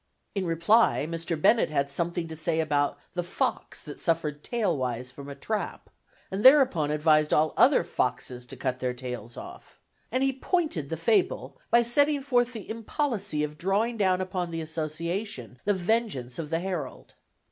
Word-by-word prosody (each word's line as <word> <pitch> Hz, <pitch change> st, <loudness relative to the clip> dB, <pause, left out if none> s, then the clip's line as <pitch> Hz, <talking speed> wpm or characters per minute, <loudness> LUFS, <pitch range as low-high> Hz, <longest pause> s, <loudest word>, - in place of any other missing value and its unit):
In 195 Hz, -3 st, -2 dB
reply, 170 Hz, +2 st, +3 dB
Mr. 165 Hz, -1 st, -3 dB
Bennett 225 Hz, +8 st, +4 dB
had 140 Hz, -2 st, 0 dB
something 170 Hz, +2 st, -1 dB
to 160 Hz, -, -7 dB
say 160 Hz, +1 st, -1 dB
about 145 Hz, -2 st, +1 dB, 0.2 s
the 180 Hz, -, -1 dB
fox 175 Hz, -, -2 dB
that 150 Hz, -, -8 dB
had -, -, -15 dB
suffered 150 Hz, -3 st, -1 dB
tailwise 130 Hz, -, -1 dB
from 140 Hz, +2 st, -10 dB
a 140 Hz, -, -7 dB
trap, 210 Hz, +9 st, -4 dB, 0.4 s
and 195 Hz, +2 st, -2 dB
thereupon 260 Hz, -, +6 dB
advised 155 Hz, 0 st, +3 dB
all 155 Hz, +1 st, +3 dB
other -, -, +5 dB
foxes 125 Hz, -1 st, -2 dB
to 135 Hz, -, -9 dB
cut 130 Hz, 0 st, -2 dB
their 125 Hz, -1 st, -2 dB
tails 125 Hz, -2 st, -7 dB
off; -, -, -11 dB, 0.3 s
and 255 Hz, +3 st, +1 dB
he 270 Hz, 0 st, +2 dB
pointed 270 Hz, -, -1 dB
the 165 Hz, -, -3 dB
fable 165 Hz, -, +1 dB
by 235 Hz, +1 st, +5 dB
setting 285 Hz, +4 st, +2 dB
forth 245 Hz, -3 st, +2 dB
the 220 Hz, -4 st, -8 dB
impolicy 225 Hz, -, -2 dB
of 150 Hz, 0 st, -5 dB
drawing 205 Hz, +6 st, +1 dB
down 190 Hz, -4 st, +2 dB
upon 185 Hz, -2 st, -3 dB
the 165 Hz, -1 st, -4 dB
Association 160 Hz, -, -4 dB
the 205 Hz, -, +3 dB
vengeance 185 Hz, -, -1 dB
of 155 Hz, -3 st, -4 dB
the 165 Hz, +1 st, 0 dB
Herald. 185 Hz, -2 st, -5 dB
165 Hz, 170 wpm, -27 LUFS, 145-215 Hz, 0.4 s, thereupon